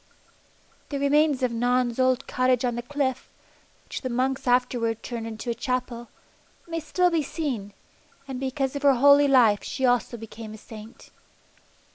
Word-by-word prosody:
The 285 - -3
remains 280 -1 +2
of 250 - +1
Non's 245 +1 0
old 255 0 +2
cottage 255 -1 +1
on 245 - 0
the 240 - -3
cliff, 260 0 -2 0.6
which - - -6
the 255 - -3
monks 260 +2 -1
afterwards 245 -2 +1
turned 230 -2 -5
into 225 +2 -5
a - - 0
Chapel, 240 0 -3 0.6
may 330 0 -3
still 355 +3 +1
be 330 -2 +2
seen, 265 -9 -4 0.6
and 265 -2 -5
because 270 +1 -2
of 285 - -3
her 280 -2 +5
holy 285 +3 +6
life 235 -7 +4
she 265 - -2
also 245 -1 +1
became 220 -1 -9
a - - -11
saint. 215 +1 -13
255 Hz, 160 wpm, -25 LUFS, 235-275 Hz, 0.6 s, holy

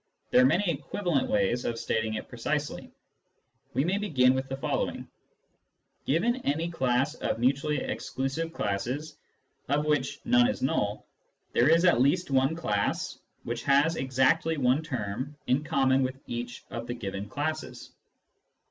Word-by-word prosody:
There 125 - +6
are - - +6
many 180 +8 +2
equivalent 170 0 -1
ways 105 +4 +1
of 115 - -2
stating 110 -1 -1
it - - -5
precisely. - - -3 0.8
We 135 - +3
may 190 +4 +1
begin 130 -11 +3
with 130 0 -3
the 135 - -3
following: - - -2 0.3
— - - -46
" - - -46
Given 210 - +2
any 165 - -1
class 130 -1 +1
of 160 - -2
mutually 140 +5 +1
exclusive 135 +5 -3
classes, 125 +7 -3 0.5
of 145 +2 +1
which 145 -3 0
none 245 0 +5
is 260 - -2
null, 105 -5 0 0.5
there - - +4
is 165 +2 +5
at 170 -9 +5
least 145 +4 +2
one 135 +3 +3
class 105 -12 -1 0.2
which 120 0 -3
has 145 +4 +3
exactly 145 +5 +2
one 130 +2 +3
term 130 -1 -4
in 130 +4 +1
common 135 -3 +2
with 130 0 -2
each 120 0 -5
of 115 0 -5
the 120 - -3
given 100 -2 -5
classes." 155 +5 -4
135 Hz, 155 wpm, -28 LUFS, 125-160 Hz, 0.8 s, There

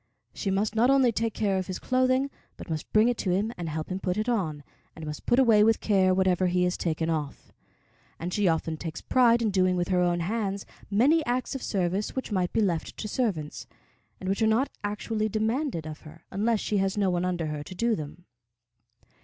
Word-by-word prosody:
She 200 - -3
must 200 +3 0
not 230 +3 +3
only 270 -3 +5
take 225 0 -2
care 195 -3 +1
of 185 - -4
his 185 - -4
clothing, 255 +1 +1 0.3
but - - -8
must 155 -1 -4
bring 215 +2 +5
it 245 -1 0
to 190 - -1
him 200 +6 0
and 170 -2 -5
help 155 0 -4
him 185 - -2
put 180 0 -2
it 215 +2 -1
on, 160 -11 -1 0.3
and 160 - -8
must 150 -1 -7
put 240 - +3
away 225 -5 +6
with 225 +1 +3
care 190 -3 +3
whatever 185 -1 +2
he 180 0 +1
has 180 0 +1
taken 160 -1 -1
off; 155 -3 -3 0.7
and 175 +2 -4
she 205 -2 +2
often 160 -1 0
takes 165 0 -6
pride 240 -2 +3
in 215 - +1
doing 185 -1 +2
with 175 +1 -1
her 180 -1 +2
own 175 -1 +1
hands 200 +1 -2 0.2
many 275 +11 +4
acts 250 +1 -1
of 270 - -4
service 190 +1 -1
which 260 -3 -4
might 185 -3 0
be 225 - +1
left 175 -6 -1
to 215 - -4
servants, 195 - -2 0.5
and 185 - -6
which 195 +3 0
are 220 - +4
not 230 +6 +2
actually 215 +1 -2
demanded 220 - -1
of 155 0 -7
her, 160 +1 -14
unless 215 +3 +1
she 210 - -1
has 195 +1 0
no 195 -2 +2
one 175 0 0
under 180 -2 -1
her 150 -1 -4
to 185 +6 -9
do 230 +4 +1
them. 155 +2 -8
195 Hz, 220 wpm, -27 LUFS, 175-225 Hz, 0.7 s, away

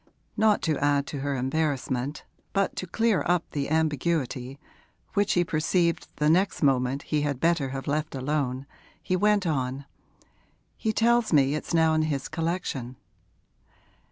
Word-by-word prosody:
Not 215 -1 +3
to 155 -4 0
add 145 -1 +2
to 145 - -3
her 140 0 -2
embarrassment, 135 0 -2 0.3
but 195 -1 +1
to 185 - -4
clear 225 +2 +1
up 175 -1 +2
the 140 -2 -2
ambiguity, 145 -4 -1 0.6
which 205 0 +2
he 175 - +3
perceived 170 +1 0
the 150 - +1
next 180 +2 +2
moment 135 0 +2
he 150 -1 -1
had 145 -3 -1
better 165 -4 +1
have 135 0 -5
left 150 0 -2
alone, 135 -1 -2 0.4
he 185 - 0
went 205 +1 +2
on: 135 -3 -2 0.9
'He 220 - -1
tells 235 +1 +2
me 140 -3 +4
it's 155 +2 -2
now 160 -1 +4
in 155 - +2
his 145 -3 -2
collection.' 160 -7 -3
155 Hz, 150 wpm, -26 LUFS, 135-170 Hz, 0.9 s, me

